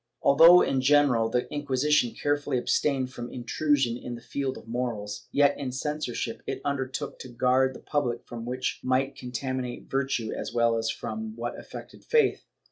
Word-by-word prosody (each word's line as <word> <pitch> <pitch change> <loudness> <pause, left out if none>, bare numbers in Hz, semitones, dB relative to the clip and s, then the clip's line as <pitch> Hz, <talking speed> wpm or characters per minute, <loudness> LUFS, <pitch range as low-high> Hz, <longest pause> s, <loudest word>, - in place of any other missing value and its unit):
Although 165 +5 +8
in 135 - +1
general 135 -5 +4
the 125 +2 0
Inquisition 145 -2 +1
carefully 145 -2 0
abstained 130 0 0
from 120 -1 -7
intrusion 130 0 0
in 120 0 -6
the 120 - -10
field 135 +1 -3
of - - -13
morals, 115 -4 -4
yet 140 0 +4
in 135 -3 -3
censorship 130 -4 -3
it - - -3
undertook, 140 0 -3
to 130 - -8
guard 130 +2 +2
the - - -10
public 135 -5 -2
from 115 -1 -7
that - - -5
which 130 +1 -2
might 130 +2 +1
contaminate 125 0 -5
virtue 135 -5 -1
as - - -4
well 115 -1 +2
as 115 0 -1
from 110 -1 -5
what 120 +1 -4
affected - - -11
faith. 465 -1 +2
130 Hz, 170 wpm, -27 LUFS, 120-140 Hz, -, Although